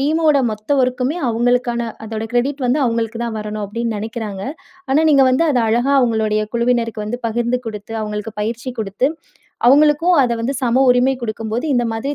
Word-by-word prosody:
டீமோட 305 +1 +3
மொத்த 215 +3 -10
ஒர்க்குமே 255 +6 -1
அவங்களுக்கான 240 0 0 0.2
அதோட 220 0 -4
கிரெடிட் 270 +3 0
வந்து 275 +5 +1
அவங்களுக்கு 230 0 -2
தான் 225 -2 -4
வரணும் 210 0 -4
அப்டின்னு 230 +1 -3
நினைக்கிறாங்க. 215 -3 -5 0.5
ஆனா, 285 - +4
நீங்க 275 -1 +6
வந்து 270 +6 +2
அத 260 - +2
அழகா 240 +5 +2
அவங்களுடைய 220 -3 +1
குழுவினருக்கு 235 -2 0
வந்து 245 +3 -4
பகிர்ந்து 240 +2 0
கொடுத்து, 215 0 -6
அவங்களுக்கு 210 +1 -5
பயிற்சி 235 +4 -3
கொடுத்து, 210 +5 -1 0.6
அவங்களுக்கும் 300 +6 +5
அத 245 -3 +2
வந்து 245 +5 -2
சம 250 +1 +2
உரிமை 250 +2 +3
கொடுக்கும் 220 -1 -4
போது 240 +5 -1
இந்த 240 -1 +2
மாதிரி 245 +6 -3
235 Hz, 170 wpm, -18 LUFS, 220-260 Hz, 0.6 s, நீங்க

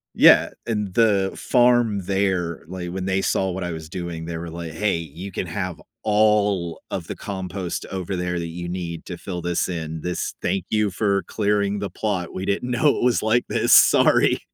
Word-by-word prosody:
Yeah, - - +7 0.2
and 105 -4 -2
the 100 -4 +3
farm 120 -4 +3
there, 95 -4 0
like, 90 0 -5
when 95 0 -4
they 95 0 +1
saw 95 -1 0
what 95 +1 -4
I 90 - -3
was 80 -1 -7
doing, 85 -2 -5
they 85 0 -4
were 85 +1 -6
like, 85 -1 -6
"Hey. 100 +2 0
You 85 +5 -8
can 95 - -3
have 90 -1 -4 0.2
all 105 -5 +2
of - - -4
the - - -5
compost 95 -2 -5
over 95 0 -3
there 90 0 -2
that 85 - -3
you 85 +1 -6
need 85 -2 -5
to 90 - -6
fill 90 0 -5
this 85 +1 -1
in. 80 -2 -4
This 90 +1 -3
Thank 95 -3 -1
you 105 -1 +2
for 100 0 +1
clearing 100 +2 0
the 100 -1 -3
plot. 95 -3 -2
We 95 - -4
didn't 100 +5 -1
know 125 +5 +3
it - - -2
was 125 -1 +3
like 115 +3 +2
this. - - +2
Sorry." - - +6
95 Hz, 200 wpm, -23 LUFS, 85-105 Hz, 0.2 s, Yeah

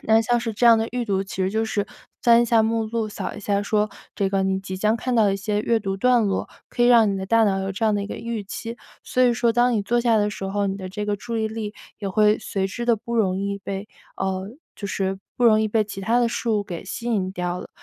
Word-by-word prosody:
那 220 0 +4
像 240 +2 +1
是 230 -1 -3
这 240 +3 +2
样 230 -1 +8
的 225 +1 -1
预 245 0 -2
读， 195 -3 0
其 190 - -8
实 185 - 0
就 220 +2 0
是 205 -2 -1 0.4
翻 235 0 +6
一 - - +2
下 230 -1 +4
目 225 0 0
录， 220 0 -2
扫 - - -5
一 210 - -8
下 200 0 0
说 210 0 0 0.2
这 195 - 0
个 195 0 0
你 190 0 0
即 190 -1 -6
将 215 +4 +2
看 250 +2 -2
到 220 - +5
的 195 -1 +2
一 - - -2
些 205 +1 -2
阅 230 0 +1
读 195 -1 -3
段 245 +1 +3
落， 195 - -1 0.2
可 - - -7
以 - - +6
让 230 -4 +6
你 - - -2
的 190 - -4
大 230 +3 +4
脑 195 -3 +2
有 195 0 -3
这 210 +4 -2
样 215 - +3
的 205 - 0
一 - - -4
个 - - -6
预 230 -3 -4
期， 230 +4 -6 0.3
所 255 - -2
以 245 -2 +5
说 235 -1 +2
当 245 +1 +3
你 210 -3 +1
坐 240 +4 +1
下 235 -2 +3
的 210 -1 +2
时 195 -1 -6
候， 200 +1 -1
你 195 - -2
的 190 -2 -6
这 210 +3 -4
个 205 0 -1
注 230 +3 -5
意 220 0 0
力 215 -1 -5 0.2
也 200 -2 -3
会 210 +2 +3
随 195 -3 -2
之 235 +4 -5
地 235 - +5
不 235 +3 -5
容 190 -4 +2
易 200 0 -2
被 195 +1 -6 0.3
呃 190 0 -2 0.3
就 200 - -5
是 190 0 -2 0.2
不 245 - +1
容 215 -2 +6
易 220 - +1
被 215 0 +2
其 205 -2 -7
他 230 +5 +2
的 235 - +3
事 235 0 -3
物 210 -2 +2
给 175 -2 -7
吸 230 +5 -6
引 195 -5 0
掉 180 -1 -3
了， - - -9
210 Hz, 315 characters per minute, -23 LUFS, 195-230 Hz, 0.4 s, 样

